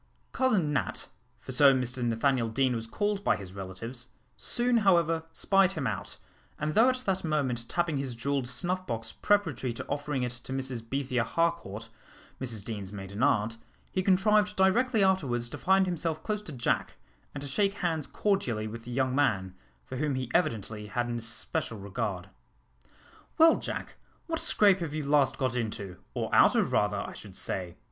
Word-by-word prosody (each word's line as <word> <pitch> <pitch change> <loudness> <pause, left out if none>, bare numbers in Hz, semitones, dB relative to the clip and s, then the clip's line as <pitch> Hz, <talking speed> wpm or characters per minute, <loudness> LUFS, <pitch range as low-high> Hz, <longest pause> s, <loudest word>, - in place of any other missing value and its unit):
Cousin 205 - +2
Nat 140 - -2 0.3
for - - -9
so 135 +1 +6
Mr 125 0 -1
Nathaniel 120 +1 +1
Deane 130 +2 +1
was 115 -1 -4
called 205 - -1
by - - +3
his 95 -2 -9
relatives 100 +6 -6 0.3
soon 240 0 +1
however 170 -6 +3
spied 195 +2 +3
him 155 -6 -3
out, 105 -5 -3 0.4
and 150 +1 -2
though 230 +7 +6
at 255 0 -1
that 190 -1 0
moment 130 -7 -1
tapping 170 -4 0
his 135 -3 -3
jewelled 135 +2 -1
snuff 185 +8 -1
box 115 -1 -3
preparatory 165 - +1
to - - -6
offering 145 -2 -2
it 125 - -1
to 120 +2 -9
Mrs 130 -3 -3
Bethia 125 0 -1
Harcourt, 115 -7 -1 0.5
Mrs 115 -6 -3
Deane's 100 -4 -5
maiden 100 +1 -6
aunt, 115 -5 +2 0.3
he 185 - 0
contrived 210 +3 +3
directly 220 +4 +3
afterwards 135 -11 +1
to - - -6
find 190 0 +4
himself 165 -3 -2
close 210 -1 -2
to 190 - -8
Jack, 125 -4 -1 0.4
and 140 - -4
to - - -5
shake 195 +8 +1
hands 165 -6 -1
cordially 135 - 0
with 115 +1 -8
the 120 - -7
young 130 +1 +1
man, 105 -10 +1 0.3
for 130 - -6
whom 145 0 0
he 130 -2 -3
evidently 105 -1 0
had 120 +3 -1
an 120 - -2
especial 115 0 -2
regard. 100 -1 -4 1.1
"Well, 325 -1 +7
Jack, - - -5 0.3
what 325 -1 -2
scrape 200 -2 +4
have 160 -3 -4
you 155 - -2
last 140 -2 +3
got 130 -3 0
into, 105 -6 -3 0.2
or - - -2
out - - +6
of - - +2
rather, - - +2
I - - -7
should - - -10
say?" 90 -2 -2
135 Hz, 175 wpm, -29 LUFS, 115-185 Hz, 1.1 s, Well